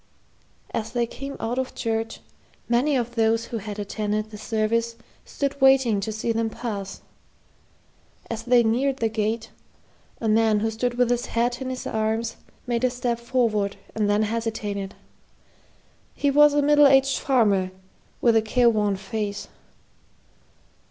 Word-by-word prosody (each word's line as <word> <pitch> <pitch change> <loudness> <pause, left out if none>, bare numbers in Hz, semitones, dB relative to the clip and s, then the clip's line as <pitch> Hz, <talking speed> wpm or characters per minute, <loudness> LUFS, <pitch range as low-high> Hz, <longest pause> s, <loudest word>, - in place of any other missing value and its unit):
As 225 +1 -3
they 240 -1 +1
came 275 +4 -7
out 240 +3 -2
of 260 - -4
church, 225 -1 -3 0.5
many 250 +5 +2
of 240 -2 -1
those 225 0 +2
who 235 - -5
had 205 0 -7
attended 210 +1 -3
the 210 - -8
service 225 +1 -1 0.3
stood 280 0 -3
waiting 265 -6 +5
to 200 +2 -3
see 215 +2 -2
them 225 0 0
pass. 205 -4 -5 1.3
As 230 -1 -4
they 245 +1 +4
neared 260 +4 +1
the 225 -3 0
gate, 220 +1 -2 0.7
a 225 - -2
man 215 -1 +3
who 225 0 0
stood 240 +2 -2
with 245 -1 +3
his 245 0 0
hat 240 +2 -1
in 260 - -3
his 255 -1 -5
hand 220 +1 -1 0.3
made 240 -1 -1
a 255 - +4
step 245 -1 -2
forward 230 -5 0 0.2
and 210 -2 0
then 205 +1 +3
hesitated. 215 -3 -3 1.2
He 285 - +1
was 295 +1 +6
a 290 - +3
middle 295 0 +6
aged 270 0 +4
farmer, 205 -8 +2 0.5
with 235 -2 +4
a 225 - +5
careworn 215 -3 +2
face. 205 +1 -4
230 Hz, 150 wpm, -24 LUFS, 215-245 Hz, 1.3 s, was